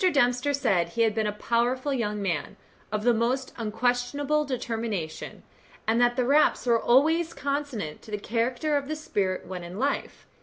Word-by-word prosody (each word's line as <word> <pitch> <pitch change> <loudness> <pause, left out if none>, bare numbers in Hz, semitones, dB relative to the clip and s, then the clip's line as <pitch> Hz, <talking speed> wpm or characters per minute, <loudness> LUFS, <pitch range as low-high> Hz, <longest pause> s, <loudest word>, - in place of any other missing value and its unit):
Dempster 250 -1 +2
said 190 -11 +1
he 230 +6 +1
had 220 -2 +2
been 220 -1 0
a - - 0
powerful 240 +6 0
young 210 -5 -1
man, 170 -7 -2 0.3
of 215 0 -1
the 240 0 +4
most 250 +3 0
unquestionable 245 +6 0
determination, 225 - -4 0.4
and 225 +2 +3
that 240 0 +4
the 250 -1 +1
raps 285 +2 +3
were 235 -2 +3
always 320 +7 +3
consonant 280 - -3
to - - -15
the 210 - -2
character 240 +8 -1
of 280 -1 -1
the 310 - -2
spirit 195 -11 -2
when 185 -1 -6
in 175 +2 -8
life. 280 +5 -2
240 Hz, 175 wpm, -27 LUFS, 210-275 Hz, 0.4 s, the